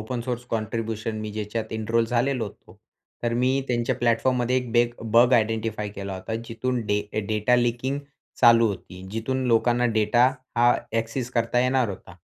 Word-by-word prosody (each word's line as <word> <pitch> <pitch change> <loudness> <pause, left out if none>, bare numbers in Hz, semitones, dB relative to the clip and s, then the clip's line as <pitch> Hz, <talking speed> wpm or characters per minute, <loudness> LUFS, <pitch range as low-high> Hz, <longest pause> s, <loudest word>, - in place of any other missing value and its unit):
Open 120 +3 -4
source 120 0 -4
contribution 110 0 -3
मी 110 0 -5
ज्याच्यात 110 +1 -4
enrol 115 +1 +1
झालेलो 125 0 0
होतो. 100 - -13 0.4
तर 120 0 0
मी 130 +2 +2
त्यांच्या 120 -1 0
प्लॅटफॉर्ममध्ये 120 +1 +1
एक 125 -2 -2
बेग 120 0 +3 0.2
बग 120 +2 +6
आइडेंटिफाई 110 -2 +1
केला 100 -1 -6
होता, 95 +4 -5
जिथून 125 +2 -2
डे 105 0 +1 0.3
डेटा 110 +3 +2
लीकिंग 120 +3 0 0.4
चालू 115 -2 +7
होती. 95 -1 -7
जिथून 130 +4 -2
लोकांना 120 +1 +3
डेटा 110 +3 +4 0.3
हा 120 +1 +5
अ‍ॅक्सेस 115 +2 -3
करता 115 0 0
येणार 125 -1 +2
होता, 95 -2 -9
115 Hz, 155 wpm, -25 LUFS, 110-125 Hz, 0.4 s, चालू